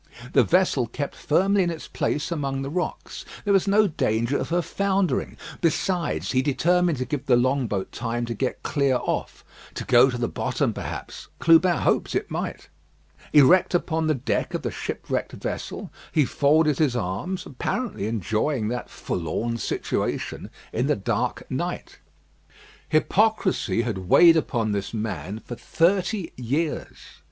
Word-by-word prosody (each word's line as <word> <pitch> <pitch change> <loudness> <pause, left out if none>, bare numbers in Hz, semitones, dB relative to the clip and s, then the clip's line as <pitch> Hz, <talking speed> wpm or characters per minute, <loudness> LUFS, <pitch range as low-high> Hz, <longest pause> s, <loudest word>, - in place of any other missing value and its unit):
The - - +6
vessel 175 -9 +2
kept 140 +5 -4
firmly 195 +6 +2
in 175 - +1
its 165 -2 -6
place 150 +4 -2
among 135 -4 -2
the 135 - -5
rocks; 180 +2 -4 0.2
there 205 - +3
was 195 0 +3
no 210 +2 +5
danger 115 - 0
of - - -2
her 175 +1 +1
foundering. 195 -1 0 0.2
Besides, 170 +1 0
he 130 - +3
determined 170 +4 +2
to 130 - -2
give 140 +2 -4
the 125 - +5
long 130 +1 +2
boat 95 -3 -3
time 120 0 -3
to 115 - -3
get 125 +3 -3
clear 140 -3 +1
off - - -3 0.3
to - - -4
go 125 +1 +6
to 125 - -3
the 120 -1 -1
bottom, - - -1
perhaps. - - -7
Clubin 170 +1 +5
hoped - - +1
it - - -2
might. - - -4 0.6
Erect 165 +6 +5
upon 160 -2 0
the 155 - +2
deck 130 - -2
of - - -3
the - - -2
shipwrecked - - -4
vessel, - - -5 0.2
he 150 -3 +3
folded 150 +2 +2
his 145 -6 +2
arms, 120 - -3
apparently 145 - -3
enjoying 110 - -1
that 125 +1 -4
forlorn 110 +8 -3
situation - - -3 0.2
in 120 +4 0
the 150 - +2
dark 100 - -2
night. - - -4 0.9
Hypocrisy 190 - +2
had 115 -6 -2
weighed 170 -1 +8
upon 120 -8 0
this 100 +2 -3
man 105 -3 -4
for - - -6
thirty 185 - 0
years. 140 +6 -2
145 Hz, 155 wpm, -24 LUFS, 120-175 Hz, 0.9 s, weighed